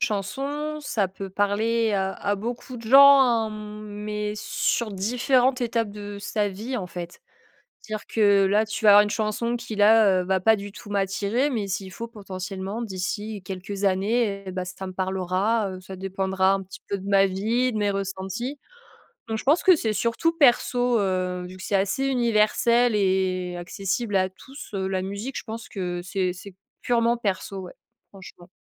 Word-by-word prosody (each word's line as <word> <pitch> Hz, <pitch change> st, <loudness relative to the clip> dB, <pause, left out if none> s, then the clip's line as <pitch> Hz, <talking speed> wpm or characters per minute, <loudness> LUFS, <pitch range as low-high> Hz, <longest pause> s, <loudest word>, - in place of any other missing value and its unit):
chanson, 275 Hz, +7 st, -2 dB
ça 220 Hz, -9 st, -1 dB
peut 195 Hz, +1 st, -8 dB
parler 215 Hz, +3 st, +1 dB
à 190 Hz, -1 st, 0 dB
à 205 Hz, +1 st, -1 dB
beaucoup 240 Hz, +4 st, -6 dB
de 230 Hz, -, -10 dB
gens, 280 Hz, +2 st, +9 dB
hein, 230 Hz, -3 st, +1 dB
mais 210 Hz, 0 st, -5 dB
sur 215 Hz, +1 st, -1 dB
différentes 250 Hz, +6 st, +1 dB
étapes 230 Hz, -3 st, -1 dB
de 205 Hz, 0 st, -8 dB
sa 210 Hz, 0 st, -1 dB
vie, 220 Hz, +7 st, -5 dB
en 195 Hz, -6 st, -4 dB
fait. 175 Hz, 0 st, -8 dB, 0.7 s
Dire 215 Hz, -1 st, -5 dB
que 200 Hz, -3 st, +4 dB
là, 205 Hz, +3 st, +3 dB
tu 220 Hz, +1 st, -5 dB
vas 210 Hz, -, +9 dB
avoir 205 Hz, +1 st, +9 dB
une 210 Hz, -, -3 dB
chanson 220 Hz, +3 st, -1 dB
qui, 235 Hz, -2 st, -7 dB
là, 205 Hz, -2 st, +5 dB
heu, -, -, -5 dB
va 190 Hz, +1 st, +1 dB
pas 220 Hz, +4 st, +4 dB
du 205 Hz, -1 st, -7 dB
tout 205 Hz, -, -12 dB
m'attirer, 205 Hz, +6 st, 0 dB
mais 220 Hz, -7 st, -2 dB
s'il 190 Hz, 0 st, -4 dB
faut, 230 Hz, +4 st, -6 dB
potentiellement, 195 Hz, 0 st, -6 dB
d'ici 205 Hz, 0 st, -4 dB
quelques 195 Hz, +2 st, -6 dB
années 200 Hz, +1 st, +1 dB
et -, -, -4 dB
bah, 185 Hz, 0 st, -4 dB
ça 185 Hz, +1 st, -7 dB
me 185 Hz, -, -7 dB
parlera, 190 Hz, +3 st, 0 dB
heu, 185 Hz, 0 st, -8 dB
ça 190 Hz, +1 st, -9 dB
dépendra 190 Hz, 0 st, +1 dB
un 195 Hz, 0 st, -2 dB
petit 190 Hz, -, -12 dB
peu 200 Hz, -, -2 dB
de 195 Hz, +1 st, -9 dB
ma 195 Hz, -1 st, +4 dB
vie, 225 Hz, +7 st, 0 dB
de 215 Hz, -, -2 dB
mes 205 Hz, -1 st, +1 dB
ressentis. 195 Hz, +7 st, -4 dB, 0.7 s
Donc 220 Hz, -, -2 dB
je -, -, -6 dB
pense 300 Hz, +6 st, +3 dB
que 370 Hz, -, +7 dB
c'est 220 Hz, -5 st, -1 dB
surtout 235 Hz, +10 st, 0 dB
perso, 245 Hz, -4 st, +3 dB
heu, 185 Hz, -2 st, -1 dB
vu 185 Hz, -, -11 dB
que 185 Hz, -, -10 dB
c'est 205 Hz, -, -1 dB
assez 200 Hz, +8 st, +1 dB
universel 235 Hz, -1 st, +3 dB
et 185 Hz, -2 st, 0 dB
accessible 195 Hz, +5 st, -3 dB
à 185 Hz, 0 st, +1 dB
tous, 265 Hz, +9 st, -12 dB
heu, 190 Hz, -1 st, -1 dB
la 190 Hz, -1 st, -1 dB
musique. 200 Hz, +7 st, -5 dB
Je -, -, -5 dB
pense 225 Hz, 0 st, -7 dB
que 180 Hz, -3 st, -4 dB
c'est 185 Hz, 0 st, -1 dB
c'est 185 Hz, +1 st, -11 dB, 0.3 s
purement 235 Hz, -1 st, +2 dB
perso, 195 Hz, -3 st, -3 dB
ouais, 180 Hz, -, -9 dB, 0.4 s
franchement. 185 Hz, -2 st, -13 dB
205 Hz, 185 wpm, -25 LUFS, 190-230 Hz, 0.7 s, gens